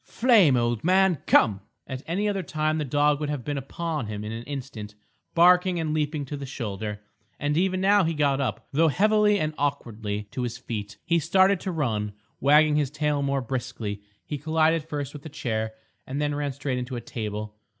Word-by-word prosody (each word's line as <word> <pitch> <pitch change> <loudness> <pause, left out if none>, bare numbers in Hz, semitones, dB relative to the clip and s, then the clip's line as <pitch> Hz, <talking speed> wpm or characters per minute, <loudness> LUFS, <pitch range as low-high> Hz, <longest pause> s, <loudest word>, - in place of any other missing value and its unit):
"Flame, 210 - +4
old 120 -2 0
man! 185 -2 +3
come!" 100 -4 +4 0.2
At 130 -1 -6
any 195 +6 0
other 200 -2 0
time 155 -2 -1
the - - 0
dog 145 +1 +2
would 150 -1 -2
have 145 -5 -3
been 145 -1 -2
upon 150 -1 -4
him 105 -1 -5
in 105 - -5
an 115 +1 -5
instant, 115 -7 -7 0.4
barking 180 +1 +5
and 155 -2 -1
leaping 150 -1 -1
to 145 - -5
the 140 -1 -6
shoulder. 105 -5 -5 0.4
And 145 0 0
even 185 +2 +1
now 200 +1 +5
he 165 -1 0
got 140 -2 +2
up, 125 -6 -3
though 160 +3 +4
heavily 210 +4 +3
and 155 0 -1
awkwardly, 110 -7 -2
to 130 - -4
his 120 -1 -3
feet. 105 -4 -6
He 170 0 +3
started 190 +4 +3
to 185 - -3
run, 110 -10 -1 0.3
wagging 150 +2 +5
his 145 -3 +1
tail 150 0 0
more 140 -1 0
briskly. 115 -5 -4 0.2
He 150 - -4
collided 160 +1 +2
first 145 -3 -5
with 145 -2 -9
a 155 - -7
chair, 110 -7 -3 0.3
and 135 +2 -3
then 145 0 0
ran 145 -1 -2
straight 135 -1 -2
into 125 +1 -5
a 120 - -4
table. 105 -2 -5
145 Hz, 200 wpm, -26 LUFS, 120-160 Hz, 0.4 s, barking